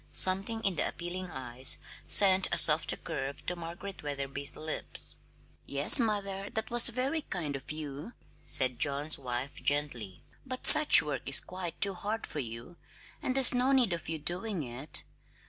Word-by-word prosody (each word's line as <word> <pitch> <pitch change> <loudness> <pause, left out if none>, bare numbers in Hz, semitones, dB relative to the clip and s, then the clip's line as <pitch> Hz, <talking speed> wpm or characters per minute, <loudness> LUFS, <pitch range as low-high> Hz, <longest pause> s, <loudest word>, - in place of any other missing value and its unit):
Something 195 +4 +5
in 195 -5 -3
the - - -2
appealing 180 +1 -9
eyes 130 -2 +1 0.3
sent 190 -1 +4
a - - -2
softer 155 0 +3
curve 140 -4 -9
to 180 - -4
Margaret 175 +3 -11
Wetherby's 140 -1 -4
lips. 155 0 -6 0.5
"Yes, 140 - +5
mother; 200 -3 -4
that 220 +1 -4
was 240 -1 +6
very 265 +7 -5
kind 160 - -7
of 135 +1 -10
you," 150 - -10 0.3
said 130 -2 +4
John's 145 +1 +1
wife 125 +1 -7
gently. 125 -10 -3 0.2
"But 255 -1 -9
such 305 -1 +8
work - - -7
is - - +3
quite 180 -2 -10
too 200 -1 +2
hard 210 +4 -7
for 150 - -9
you, 120 +6 -10 0.4
and 255 - -5
there's 270 -2 +6
no 250 +2 -1
need 245 -8 0
of 170 - -9
your 165 - -6
doing 175 +4 -6
it. 125 +4 -4
170 Hz, 165 wpm, -27 LUFS, 140-200 Hz, 0.5 s, such